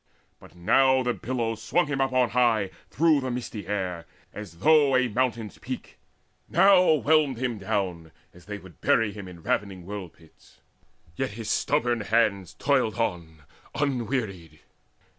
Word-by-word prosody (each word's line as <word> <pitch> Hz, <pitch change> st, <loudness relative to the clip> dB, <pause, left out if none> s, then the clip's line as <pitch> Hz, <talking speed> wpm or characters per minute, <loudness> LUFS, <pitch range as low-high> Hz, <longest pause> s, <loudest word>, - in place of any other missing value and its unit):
But 80 Hz, -, -17 dB
now 130 Hz, +9 st, +3 dB
the 125 Hz, 0 st, 0 dB
billows 115 Hz, -3 st, -3 dB
swung 175 Hz, +9 st, +1 dB
him 145 Hz, -2 st, -2 dB
up 135 Hz, 0 st, +1 dB
on 125 Hz, -2 st, +2 dB
high 115 Hz, -5 st, +2 dB, 0.2 s
Through 150 Hz, -4 st, +2 dB
misty 120 Hz, -5 st, -5 dB
air, 90 Hz, -5 st, -3 dB, 0.3 s
as 100 Hz, -6 st, -9 dB
though 145 Hz, -, +4 dB
to 130 Hz, -, +3 dB
a -, -, 0 dB
mountain's 115 Hz, -2 st, -2 dB
peak, -, -, -7 dB, 0.5 s
Now 185 Hz, +1 st, +5 dB
whelmed 150 Hz, -3 st, +2 dB
him 120 Hz, -3 st, -2 dB
down, 95 Hz, -6 st, -3 dB, 0.2 s
as 90 Hz, -, -17 dB
they 105 Hz, 0 st, -6 dB
would 95 Hz, -5 st, -16 dB
bury 115 Hz, -2 st, +2 dB
him 100 Hz, -2 st, -9 dB
In 85 Hz, -3 st, -12 dB
ravening 95 Hz, -3 st, -2 dB
whirlpits: 90 Hz, -5 st, -11 dB, 0.6 s
yet 130 Hz, -5 st, -3 dB
his 110 Hz, 0 st, -4 dB
stubborn 120 Hz, -5 st, +1 dB
hands 105 Hz, -4 st, 0 dB
Toiled 130 Hz, -6 st, +1 dB
on 85 Hz, -9 st, -3 dB, 0.3 s
unwearied. 115 Hz, -, -3 dB
115 Hz, 145 wpm, -26 LUFS, 95-130 Hz, 0.6 s, Now